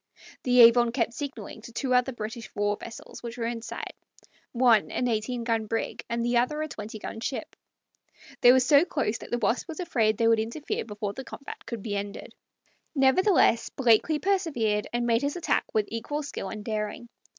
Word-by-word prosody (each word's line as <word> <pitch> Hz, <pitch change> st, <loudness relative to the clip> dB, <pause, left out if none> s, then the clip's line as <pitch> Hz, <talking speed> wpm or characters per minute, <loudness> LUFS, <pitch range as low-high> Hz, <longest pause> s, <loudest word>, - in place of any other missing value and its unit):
The 250 Hz, -1 st, +5 dB
Avon 235 Hz, 0 st, +7 dB
kept 235 Hz, -2 st, 0 dB
signaling 275 Hz, -4 st, -6 dB
to 235 Hz, -, -11 dB
two 255 Hz, +2 st, -1 dB
other 250 Hz, +1 st, +3 dB
British 225 Hz, -1 st, -6 dB
war 205 Hz, 0 st, +1 dB
vessels 230 Hz, +2 st, -10 dB
which 235 Hz, 0 st, -7 dB
were 230 Hz, -, -2 dB
in 230 Hz, 0 st, -3 dB
sight -, -, -6 dB, 0.6 s
one 235 Hz, -4 st, +4 dB
an 250 Hz, -, -1 dB
eighteen 235 Hz, +1 st, -1 dB
gun 225 Hz, -2 st, 0 dB
brig 225 Hz, +1 st, -3 dB
and 235 Hz, 0 st, -1 dB
the 240 Hz, 0 st, +2 dB
other 255 Hz, +6 st, +1 dB
a -, -, -3 dB
twenty 220 Hz, -5 st, -7 dB
gun 225 Hz, -, -7 dB
ship; 260 Hz, +4 st, -4 dB, 0.9 s
they 245 Hz, -2 st, +9 dB
were 260 Hz, -, +6 dB
so 280 Hz, +4 st, +6 dB
close 275 Hz, -10 st, -1 dB
that -, -, -10 dB
the 240 Hz, -, 0 dB
Wasp 230 Hz, -, 0 dB
was 325 Hz, 0 st, -7 dB
afraid 225 Hz, -, +1 dB
they 230 Hz, -, +3 dB
would 230 Hz, -1 st, +4 dB
interfere 235 Hz, +7 st, -3 dB
before 210 Hz, -2 st, -4 dB
the 265 Hz, -, -7 dB
combat 275 Hz, -, -9 dB
could 230 Hz, -5 st, -5 dB
be 205 Hz, -3 st, -3 dB
ended. 200 Hz, 0 st, -5 dB, 0.6 s
Nevertheless, 270 Hz, -, +4 dB
Blakeley 255 Hz, +4 st, +3 dB
persevered, 295 Hz, -, 0 dB
and 240 Hz, 0 st, -1 dB
made 230 Hz, 0 st, +2 dB
his 285 Hz, +1 st, -1 dB
attack 350 Hz, -, 0 dB
with 215 Hz, -1 st, +1 dB
equal 290 Hz, +7 st, -3 dB
skill 235 Hz, -8 st, -5 dB
and 215 Hz, 0 st, -7 dB
daring. 215 Hz, +1 st, -3 dB
235 Hz, 195 wpm, -27 LUFS, 220-265 Hz, 0.9 s, they